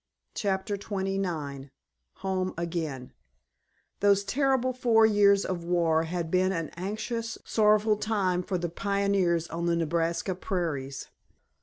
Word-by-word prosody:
*CHAPTER 200 0 -1
XXIX* 190 -9 -3 0.5
*HOME 185 -1 -2
AGAIN* 165 -7 -4 0.9
Those 200 0 +4
terrible 265 +1 +1
four 235 -3 +4
years 200 -2 +4
of 175 -2 -3
war 165 -2 +2
had 170 -1 -3
been 185 +1 +3
an 165 -4 -2
anxious, 220 +5 -4
sorrowful 215 0 +3
time 195 -5 0
for 185 +1 -2
the 175 0 -2
pioneers 195 -2 +1
on 170 +1 -3
the 170 - +2
Nebraska 170 +3 0
prairies. 165 -8 -3
185 Hz, 120 wpm, -28 LUFS, 170-205 Hz, 0.9 s, Those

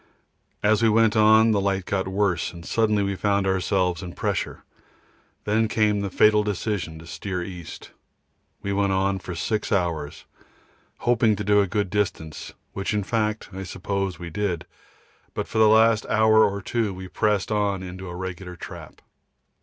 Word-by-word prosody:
As 105 +1 +3
we 115 - +4
went 110 0 +3
on 110 +1 +6
light 100 -2 0
got 95 -2 -1
worse, 95 -2 0
and 85 0 -11
suddenly 110 -2 +1
we 100 0 -1
found 100 +1 +1
ourselves 95 -2 0
in 90 -2 -7
pressure. - - -3 0.8
Then 110 +2 +2
came 105 -2 +1
the 100 - -2
fatal 105 +3 +4
decision 100 -5 -3
to 80 - -12
steer 90 +1 -4
east. 85 -4 -9 0.7
We 100 - -1
went 100 -1 +1
on 95 0 +1
for 90 -1 -7
6 105 +6 -2
hours, 85 -7 -1 0.8
hoping 115 -3 +3
to 105 - -4
do 105 +1 +4
a 100 - 0
good 100 0 -1
distance, 90 -7 -2 0.2
which 100 +2 -2
in 105 - 0
fact 110 0 -1
I 95 - -6
suppose 95 +1 -3
we 85 -1 -8
did, 95 -3 -2 0.7
but - - -3
for 110 - -2
the 110 -1 +6
last 110 0 +4
hour 110 0 +5
or 100 -1 -2
two 110 -4 -1
we 95 0 -8
pressed 105 +2 0
on 100 -3 0
into 95 0 -7
a 85 - -7
regular 90 0 -6
trap. - - -10
100 Hz, 170 wpm, -24 LUFS, 95-105 Hz, 0.8 s, on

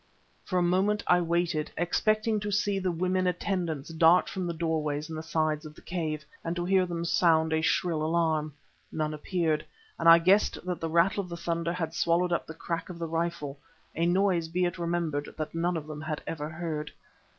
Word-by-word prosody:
For 185 - -2
a 180 - +3
moment 190 +4 +2
I 180 0 +4
waited, 170 -2 0
expecting 215 +5 +1
to 205 0 -3
see 205 0 +1
the 185 -1 0
women 185 +2 0
attendants 175 -5 -2
dart 165 +2 +5
from 185 -2 -3
the 170 - -2
doorways 155 -2 -1
in - - -4
the 155 - -4
sides 155 -1 0
of 155 -1 -10
the - - -15
cave, 155 -4 -3 0.2
and 165 +1 -2
to 175 0 -2
hear 185 0 +3
them 170 -1 -3
sound 160 -2 +3
a 160 - +2
shrill 165 -1 +1
alarm. 160 -2 +1 0.4
None 155 -1 -2
appeared, 155 0 -1 0.4
and 165 - +5
I 165 - +10
guessed 185 +5 +3
that 180 -1 -2
the 165 - -3
rattle 170 +5 +3
of 180 - -9
the 170 - -5
thunder 170 0 -2
had 165 -3 -3
swallowed 170 +1 +2
up 170 - -1
the 160 - -8
crack 165 +1 -4
of 180 - -7
the 170 - -3
rifle, 165 -4 -3 0.4
a 170 +1 +1
noise, 180 -2 +2
be 180 +2 0
it 175 +1 -3
remembered, 170 -4 -2
that 155 -1 -4
none 170 +1 0
of 155 - -5
them 150 -1 -7
had 155 -1 -4
ever 150 -2 -4
heard. 155 -2 -4
170 Hz, 205 wpm, -28 LUFS, 160-180 Hz, 0.4 s, I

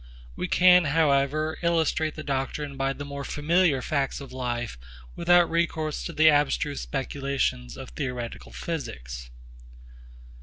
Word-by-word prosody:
We 90 - -3
can 180 -1 +6
however 150 +1 +2
illustrate 160 -2 +1
the 155 - -6
doctrine 140 +1 -3
by 135 0 0
the 145 - -7
more 140 0 -6
familiar 150 -2 +2
facts 140 -1 -1
of 140 -2 -10
life 120 - -3 0.4
without 175 0 +5
recourse 160 -2 -1
to - - -4
the 155 +1 +5
abstruse 145 -1 +2
speculations 135 - -2
of - - -8
theoretical 120 - -5
physics. 60 +1 -6
140 Hz, 125 wpm, -26 LUFS, 130-155 Hz, 0.4 s, can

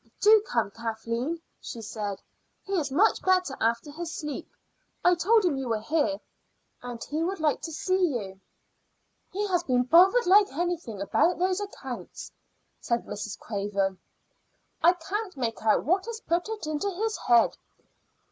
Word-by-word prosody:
"Do 430 0 +7
come, 485 - 0
Kathleen," 230 +7 -3 0.2
she 235 - -7
said. 210 -3 -5 0.4
"He 395 - -6
is 305 -7 0
much 400 +11 +3
better 370 -6 +2
after 235 +6 0
his 335 +2 -6
sleep. 300 -2 -5 0.6
I 355 - +7
told 390 +5 +3
him 310 -6 +1
you 265 -2 -3
were 225 -1 0
here, 295 +4 0 0.6
and 245 -1 -7
he 305 +2 -3
would 375 +2 -2
like 305 -2 +1
to 325 - -5
see 370 +3 +1
you." 190 -3 -8 0.9
"He 410 +3 -1
has 355 -2 +2
been 250 -6 +1
bothered 370 - +5
like 400 +3 +5
anything 340 - -3
about 345 - +2
those 370 +2 0
accounts," 260 - -7 0.5
said 235 0 -1
Mrs. 210 -1 -5
Craven. 200 -3 -2 0.8
"I 345 - +6
can't 380 +2 -5
make 230 -3 -2
out 220 -1 +3
what 375 +6 +1
has 465 -1 -5
put 345 +5 -1
it 440 -6 -4
into 310 +6 -1
his 430 +4 -2
head. 235 -2 +5
315 Hz, 155 wpm, -27 LUFS, 235-370 Hz, 0.9 s, Do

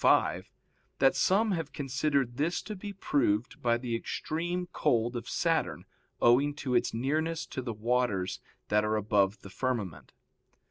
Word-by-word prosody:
ii, - - +3
5) - - +3 0.5
that 135 0 +4
some 210 +3 +3
have 165 -5 -2
considered 135 -2 0
this 160 +4 0
to 215 - -6
be 205 +2 -6
proved 125 - 0
by 120 -1 +3
the 120 -1 -3
extreme 175 +9 -2
cold 120 +1 +1
of 120 - -5
Saturn - - 0 0.3
owing 140 +5 +4
to 135 -3 -3
its 120 - +2
nearness 155 +7 -1
to 130 - -5
the 120 -2 -4
waters 110 -4 0 0.3
that 105 0 +3
are 105 0 +1
above 105 -1 +1
the 100 - -9
firmament. 115 - -3
125 Hz, 155 wpm, -30 LUFS, 115-155 Hz, 0.5 s, that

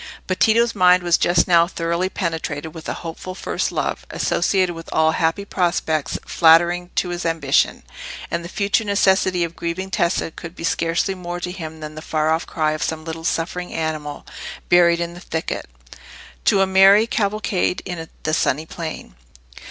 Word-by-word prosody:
But 185 - -2
Tito's 230 +1 +4
mind 180 -2 +5
was 175 -1 +3
just 175 0 +3
now 170 -2 +5
thoroughly 170 +1 -1
penetrated 160 -4 -3
with 160 -1 -8
a - - -1
hopeful 175 +3 -6
first - - -2
love, - - -2
associated 185 -3 +1
with 165 0 -10
all 160 0 +3
happy 165 +5 0
prospects 170 -6 -1
flattering 175 +2 +4
to 180 - 0
his 175 0 -4
ambition; 165 -4 +1 0.5
and 170 0 -2
that 170 - -7
future 200 +3 +1
necessity 190 -3 +2
of 170 0 -4
grieving 185 +3 -4
Tessa 170 -2 0
could 170 +2 -9
be - - -9
scarcely 165 +3 0
more 175 -1 -6
to 180 0 -4
him 160 -3 -8
than 150 0 -7
the 155 - -8
far 155 0 0
off 160 +1 0
cry 155 -1 0
of 155 - -4
some 160 -1 -3
little 165 0 -6
suffering 180 +2 -2
animal 155 -2 -4 0.4
buried 170 -1 +5
in 170 0 -3
the 175 - -10
thicket, 160 - -4 0.8
to 195 - +4
a - - +5
merry 195 +3 +6
cavalcade 210 -5 -1
in 165 -3 -6
the 155 - -1
sunny 155 0 +1
plain. 160 - -7
170 Hz, 175 wpm, -21 LUFS, 160-185 Hz, 0.8 s, merry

